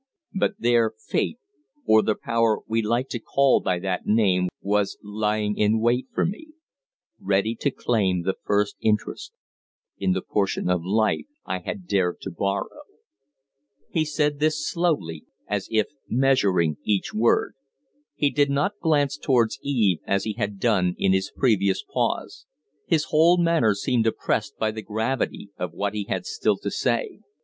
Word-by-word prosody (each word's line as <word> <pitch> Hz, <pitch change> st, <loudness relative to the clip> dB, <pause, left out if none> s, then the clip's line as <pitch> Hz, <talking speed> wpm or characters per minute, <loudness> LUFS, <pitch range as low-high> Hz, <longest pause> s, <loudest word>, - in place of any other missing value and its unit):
But 195 Hz, +2 st, 0 dB
there 115 Hz, -2 st, +2 dB
Fate 170 Hz, -, -2 dB, 0.5 s
or 110 Hz, 0 st, +6 dB
the 110 Hz, -, 0 dB
power 115 Hz, -1 st, +1 dB
we 115 Hz, +1 st, +1 dB
like 120 Hz, +4 st, 0 dB
to 120 Hz, -, -3 dB
call 135 Hz, +4 st, +3 dB
by 90 Hz, -, 0 dB
that 90 Hz, 0 st, -3 dB
name 95 Hz, -4 st, +3 dB
was 100 Hz, 0 st, 0 dB
lying 105 Hz, 0 st, -1 dB
in 105 Hz, +1 st, +2 dB
wait 120 Hz, +3 st, +1 dB
for -, -, 0 dB
me, 310 Hz, -, -6 dB, 0.7 s
ready 100 Hz, +3 st, +1 dB
to 140 Hz, -, +1 dB
claim 95 Hz, -9 st, 0 dB
the 95 Hz, -, 0 dB
first 105 Hz, 0 st, 0 dB
interest 105 Hz, -1 st, -1 dB, 0.7 s
in 95 Hz, -2 st, +1 dB
the 95 Hz, -, -2 dB
portion 100 Hz, -3 st, 0 dB
of 90 Hz, -2 st, 0 dB
life 110 Hz, -, +1 dB, 0.2 s
I -, -, -2 dB
had 190 Hz, -4 st, -6 dB
dared 95 Hz, -, 0 dB
to 95 Hz, -, -5 dB
borrow." 100 Hz, -, -3 dB, 1.1 s
He 160 Hz, -, +1 dB
said 150 Hz, -1 st, 0 dB
this 155 Hz, -1 st, +1 dB
slowly, 150 Hz, -, -1 dB, 0.2 s
as 100 Hz, -1 st, -2 dB
if 110 Hz, -2 st, +1 dB, 0.2 s
measuring 100 Hz, -, +2 dB
each 100 Hz, -3 st, 0 dB
word. 115 Hz, +2 st, +2 dB, 0.6 s
He 145 Hz, -1 st, +1 dB
did 145 Hz, -1 st, +2 dB
not 145 Hz, +9 st, 0 dB
glance 145 Hz, -3 st, +1 dB
towards 125 Hz, -1 st, +1 dB
Eve 110 Hz, -, +1 dB
as 100 Hz, 0 st, +1 dB
he 110 Hz, -, -2 dB
had 105 Hz, -2 st, -3 dB
done 95 Hz, -6 st, +2 dB
in 95 Hz, -, +2 dB
his 95 Hz, 0 st, 0 dB
previous 100 Hz, -7 st, +1 dB
pause. -, -, -3 dB, 0.4 s
His 160 Hz, -2 st, +2 dB
whole 165 Hz, +3 st, +5 dB
manner 165 Hz, -, +3 dB
seemed 115 Hz, +2 st, +1 dB
oppressed 105 Hz, -1 st, -1 dB
by 110 Hz, -1 st, 0 dB
the 110 Hz, 0 st, -6 dB
gravity 110 Hz, -1 st, -2 dB
of 90 Hz, -2 st, -3 dB
what 100 Hz, +2 st, -2 dB
he 105 Hz, -1 st, -3 dB
had -, -, -3 dB
still 445 Hz, -1 st, 0 dB
to -, -, -4 dB
say. 455 Hz, -4 st, -1 dB
110 Hz, 160 wpm, -24 LUFS, 100-135 Hz, 1.1 s, or